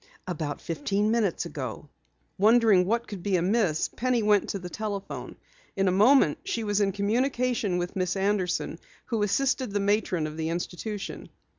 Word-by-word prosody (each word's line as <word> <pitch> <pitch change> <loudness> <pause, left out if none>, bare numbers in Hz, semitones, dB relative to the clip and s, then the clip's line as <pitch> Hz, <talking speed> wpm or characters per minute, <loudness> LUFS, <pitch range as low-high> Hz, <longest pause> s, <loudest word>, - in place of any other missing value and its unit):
"About 155 -5 -4
fifteen 200 +6 -1
minutes 215 -7 +1
ago." 135 -4 -6 0.5
Wondering 215 -3 +5
what 235 +3 0
could 200 -4 -7
be 195 +1 0
amiss, 180 -2 +1
Penny 250 -2 0
went 210 -1 +3
to - - -2
the 180 -2 -7
telephone. 200 +1 -5 0.4
In 195 0 +1
a - - +4
moment 210 - +5
she 230 - -2
was 205 -1 +1
in 195 -1 +2
communication 230 0 0
with 175 0 -3
Miss 185 -1 0
Anderson, 190 -4 -1 0.3
who 225 -3 -2
assisted 255 +5 +1
the 205 0 -1
matron 200 -4 +1
of 155 0 -6
the 160 0 -2
institution. 185 +4 -5
200 Hz, 160 wpm, -27 LUFS, 180-220 Hz, 0.5 s, Wondering